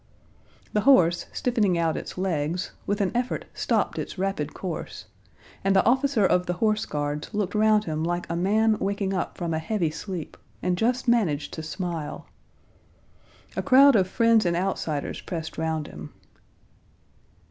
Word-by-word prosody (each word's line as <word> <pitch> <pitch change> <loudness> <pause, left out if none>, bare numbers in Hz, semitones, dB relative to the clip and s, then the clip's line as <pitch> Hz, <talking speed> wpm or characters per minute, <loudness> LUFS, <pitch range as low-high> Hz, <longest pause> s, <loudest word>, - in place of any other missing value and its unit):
The 210 - +2
horse, 180 -10 +4
stiffening 215 -8 +1
out 165 -1 +1
its - - -6
legs, 175 -1 -1 0.2
with 205 +1 0
an 190 - +1
effort 245 +1 -2
stopped - - 0
its - - -5
rapid 185 -6 -2
course, 180 -4 -6 0.6
and 195 0 +2
the 190 - +4
officer 260 -3 +3
of 180 -1 +2
the 180 - 0
horse 215 +3 0
guards 145 0 -3
looked 205 -2 -1
round 215 0 +4
him 155 -1 -2
like 175 +1 -2
a 170 - -3
man 215 +5 +2
waking 195 0 -1
up 185 - -3
from 170 -2 -2
a 160 - 0
heavy 170 -1 -1
sleep, 170 0 -6 0.3
and 180 - +1
just 245 +6 0
managed 185 -12 +1
to 160 - -5
smile. 165 -1 -5 1.3
A - - 0
crowd 275 0 +6
of 190 -3 +3
friends 230 +1 +3
and 170 -1 +1
outsiders 165 -5 -2
pressed 160 -3 -5
round 160 -1 -1
him. 75 - -9
185 Hz, 160 wpm, -25 LUFS, 165-215 Hz, 1.3 s, crowd